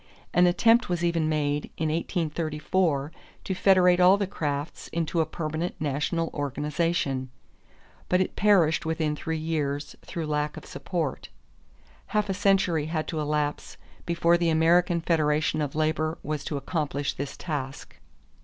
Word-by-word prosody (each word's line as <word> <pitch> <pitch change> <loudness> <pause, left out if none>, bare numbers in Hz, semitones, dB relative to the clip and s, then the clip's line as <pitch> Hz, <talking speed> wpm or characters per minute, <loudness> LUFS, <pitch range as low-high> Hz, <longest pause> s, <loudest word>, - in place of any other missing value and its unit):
An 180 +1 +5
attempt 225 +6 +4
was 175 -1 -1
even 165 -2 +1
made 145 -1 0
in 160 -1 0
1834 155 -2 -1 0.3
to 190 - -2
federate 180 -1 +4
all 180 +2 +7
the 200 - 0
crafts 150 -5 -4
into 165 0 -1
a 160 - 0
permanent 160 +2 -3
national 155 +3 -1
organization; 145 -1 -1 0.8
but 180 - +3
it 185 - -1
perished 185 -6 +4
within 160 -2 -1
three 160 +1 -3
years 150 -3 -2
through 170 -3 -5
lack 150 0 -1
of - - -9
support. 155 +1 -4 0.8
Half 210 -1 0
a - - +1
century 190 -6 +2
had 155 -1 -2
to 160 - -2
elapse 150 -1 -2 0.3
before 170 0 +3
the 170 -1 +2
American 170 +2 +3
Federation 155 -2 +1
of 145 -1 -3
Labor 155 +1 0
was 150 0 -3
to 145 - -2
accomplish 145 -2 -2
this 140 0 -6
task. 140 -5 -5
160 Hz, 145 wpm, -26 LUFS, 150-175 Hz, 0.8 s, all